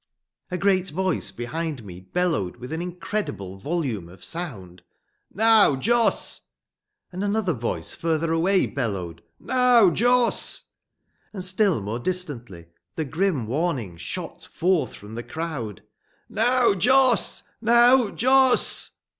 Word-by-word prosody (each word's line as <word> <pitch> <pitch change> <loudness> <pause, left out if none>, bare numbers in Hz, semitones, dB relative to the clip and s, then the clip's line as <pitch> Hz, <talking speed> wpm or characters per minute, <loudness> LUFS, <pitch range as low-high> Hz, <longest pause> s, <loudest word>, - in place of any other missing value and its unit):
A 180 - -2
great 190 -1 +2
voice 185 +2 -1
behind 145 +1 -5
me 90 -2 -9
bellowed 100 - -1
with 125 +5 -8
an 160 - -3
incredible 175 - -4
volume 130 - -3
of 90 +1 -13
sound: 105 - -5 0.5
"Now, 220 -7 +5
Jos!" 230 - +1 0.7
And 185 +2 -4
another 205 -3 0
voice, 115 - -3
further 165 0 -1
away, 185 +4 +2
bellowed: 95 -10 -4 0.2
"Now, 250 -6 +4
Jos!" 245 +5 +1 0.6
And 185 -3 -4
still 185 - +1
more 110 +4 -3
distantly 125 - -4 0.3
the 160 - -2
grim 160 - 0
warning 130 - -2
shot 155 - -6
forth 170 - 0
from 105 +2 -12
the 115 - -4
crowd: 135 - -5 0.4
"Now, 250 -3 +3
Jos! 255 +5 +3 0.2
Now, 240 +1 +5
Jos!" 260 +3 +3
170 Hz, 120 wpm, -24 LUFS, -, 0.7 s, Now